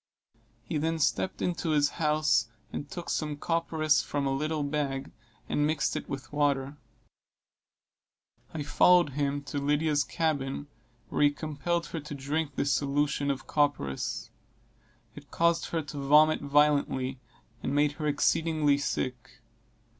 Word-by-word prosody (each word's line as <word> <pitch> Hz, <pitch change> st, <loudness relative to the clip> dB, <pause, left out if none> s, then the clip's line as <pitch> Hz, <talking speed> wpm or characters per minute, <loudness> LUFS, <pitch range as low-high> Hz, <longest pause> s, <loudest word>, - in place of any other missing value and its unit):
He 155 Hz, -, -2 dB
then 165 Hz, +2 st, 0 dB
stepped 120 Hz, -11 st, 0 dB
into 175 Hz, -1 st, -1 dB
his 145 Hz, -2 st, +3 dB
house 150 Hz, -7 st, +2 dB, 0.3 s
and 145 Hz, -, -5 dB
took 175 Hz, +2 st, -7 dB
some 150 Hz, -2 st, -2 dB
copperas 160 Hz, -1 st, +1 dB
from 145 Hz, -1 st, -2 dB
a 135 Hz, -, +1 dB
little 155 Hz, +2 st, -1 dB
bag, 140 Hz, -2 st, -2 dB, 0.4 s
and 145 Hz, 0 st, +1 dB
mixed 155 Hz, -2 st, 0 dB
it -, -, -5 dB
with 135 Hz, -1 st, -6 dB
water. 140 Hz, -1 st, +1 dB, 1.8 s
I 155 Hz, -2 st, -4 dB
followed 175 Hz, +2 st, +4 dB
him 140 Hz, 0 st, -1 dB
to 145 Hz, 0 st, -4 dB
Lydia's 145 Hz, +1 st, +1 dB
cabin, 145 Hz, -4 st, -2 dB, 0.4 s
where -, -, -1 dB
he 145 Hz, -, +7 dB
compelled 155 Hz, +3 st, -2 dB
her 165 Hz, -, -4 dB
to 150 Hz, -1 st, -7 dB
drink 140 Hz, +1 st, -2 dB
this 140 Hz, -, 0 dB
solution 140 Hz, 0 st, 0 dB
of 135 Hz, -1 st, -2 dB
copperas. 145 Hz, -, -1 dB, 0.8 s
It -, -, -13 dB
caused 170 Hz, 0 st, +2 dB
her 165 Hz, -2 st, -2 dB
to 145 Hz, 0 st, -7 dB
vomit 150 Hz, +3 st, +5 dB
violently, 140 Hz, -3 st, +2 dB, 0.4 s
and -, -, -2 dB
made 145 Hz, 0 st, +3 dB
her 150 Hz, +1 st, -4 dB
exceedingly 150 Hz, 0 st, +2 dB
sick. 125 Hz, -2 st, -3 dB
145 Hz, 140 wpm, -29 LUFS, 140-155 Hz, 1.8 s, he